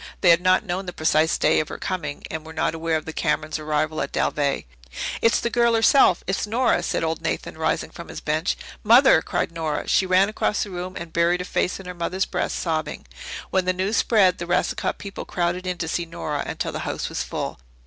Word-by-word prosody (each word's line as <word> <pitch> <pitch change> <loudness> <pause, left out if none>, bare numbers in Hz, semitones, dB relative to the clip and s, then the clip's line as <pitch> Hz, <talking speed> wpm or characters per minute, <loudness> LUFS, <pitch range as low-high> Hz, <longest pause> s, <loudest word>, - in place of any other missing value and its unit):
They 175 - +7
had 170 +1 +5
not 185 0 +3
known 185 +2 -3
the 180 - -4
precise 155 -1 +2
day 155 - +3
of 155 - -1
her - - -6
coming 160 -7 -4
and 160 -1 -4
were 160 0 -10
not 160 - 0
aware 165 0 0
of 155 - -7
the 160 - -6
Camerons' 155 0 -1
arrival 155 0 -1
at - - -3
Dalveigh. 140 -2 0 0.6
"It's 230 - +4
the 235 - -2
girl 235 -1 +3
herself. 225 -4 +5
It's 190 +3 -1
Nora," 245 +4 +2
said - - -1
old 160 0 -1
Nathan, - - -3
rising - - -1
from - - -9
his - - -7
bench. 155 +4 -1 0.3
"Mother!" 235 - +7
cried - - -2
Nora. 160 -3 -3
She 190 - +3
ran 185 +2 +4
across 215 0 0
the 205 - -8
room 180 +1 -5
and 170 -1 -7
buried 170 +1 +2
her - - -5
face 185 - -1
in 195 - -10
her 180 - -6
mother's 180 +2 -1
breast, - - -2
sobbing. 160 -2 -2 0.5
When 190 -1 +2
the 185 - +2
news 190 +4 -1
spread, 190 -6 +4
the 170 - -4
Racicot 180 - 0
people 200 -1 -7
crowded 180 +1 -2
in 180 -1 -2
to 165 - -3
see 170 +1 -1
Nora 160 -3 -3
until - - -3
the - - -4
house - - -3
was - - -3
full. - - -4
175 Hz, 225 wpm, -23 LUFS, 160-190 Hz, 0.6 s, They